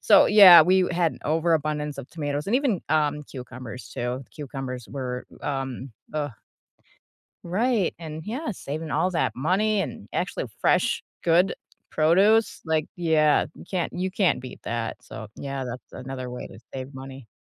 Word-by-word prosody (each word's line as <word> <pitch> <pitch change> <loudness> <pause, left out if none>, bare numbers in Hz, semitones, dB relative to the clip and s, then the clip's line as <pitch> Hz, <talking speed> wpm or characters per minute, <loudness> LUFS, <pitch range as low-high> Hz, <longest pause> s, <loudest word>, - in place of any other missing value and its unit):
so 205 -3 +7
yeah, 190 -5 +10
we 185 +2 +3
had 170 -2 +1
an - - -12
overabundance 155 -2 0
of - - -7
tomatoes 145 -1 -3
and 230 +5 +3
even, 260 - +1
um, 150 -1 +1
cucumbers 125 -2 -9
too. 125 +2 -4
Cucumbers 135 -4 -6
were, 125 -2 -4 0.2
um, 135 -2 -4 0.2
uh 145 -2 -2 1.1
Right, 210 +2 +1
and 160 -2 -7
yeah, 260 +8 -3
saving 155 -4 -5
all 160 +6 +2
that 170 - 0
money 195 - +1
and 125 - -6
actually - - -2
fresh - - +2 0.2
good 175 +3 +4 0.4
produce, 195 +8 +3
like, 160 -1 +1
yeah, 155 -3 +3
you - - -11
can't 180 -3 -2
you 185 +1 -2
can't 185 - +2
beat 130 - -9
that. 115 -1 -3
So 110 - -9
yeah, 135 -1 -4
that's 125 0 -8
another 130 -1 -6
way 125 - -6
to - - -13
save 130 +1 -6
money. 130 -2 -10
155 Hz, 155 wpm, -25 LUFS, 130-180 Hz, 1.1 s, yeah